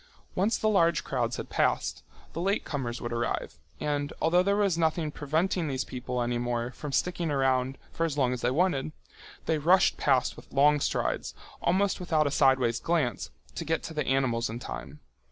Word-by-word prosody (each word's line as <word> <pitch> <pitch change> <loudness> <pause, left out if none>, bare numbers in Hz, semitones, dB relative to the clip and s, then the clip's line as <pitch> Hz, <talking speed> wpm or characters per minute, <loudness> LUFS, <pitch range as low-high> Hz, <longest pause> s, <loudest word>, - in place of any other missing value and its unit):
Once 205 +5 +1
the 215 - 0
large 170 -6 +3
crowds 125 -4 -1
had - - -5
passed, - - 0 0.3
the 165 - -3
late 195 +3 0
comers 125 -5 -3
would 120 0 -4
arrive, 120 -11 -2 0.2
and 145 -1 -1
although 175 +3 +4
there 200 +2 +2
was 200 -4 +2
nothing 160 -1 0
preventing 160 +4 0
these 135 -2 -2
people 125 -1 -3
any 120 0 -1
more 120 0 -2
from 150 +2 -7
sticking 175 +3 0
around 135 -2 +1 0.2
for 165 - -1
as 160 -3 -1
long 130 -3 +2
as 125 - -4
they 120 - +2
wanted, 155 0 +1 0.5
they 160 -1 +1
rushed 180 +5 +4
past 130 -3 +2
with - - -14
long 145 +2 +4
strides, - - -1 0.3
almost 195 +3 +1
without 160 -4 +1
a 145 - 0
sideways 130 -4 +3
glance, 160 -8 0 0.2
to - - -4
get 160 0 -1
to 160 - -6
the 150 -3 -2
animals 125 -4 +1
in 115 - -4
time. - - -8
145 Hz, 190 wpm, -28 LUFS, 125-170 Hz, 0.5 s, although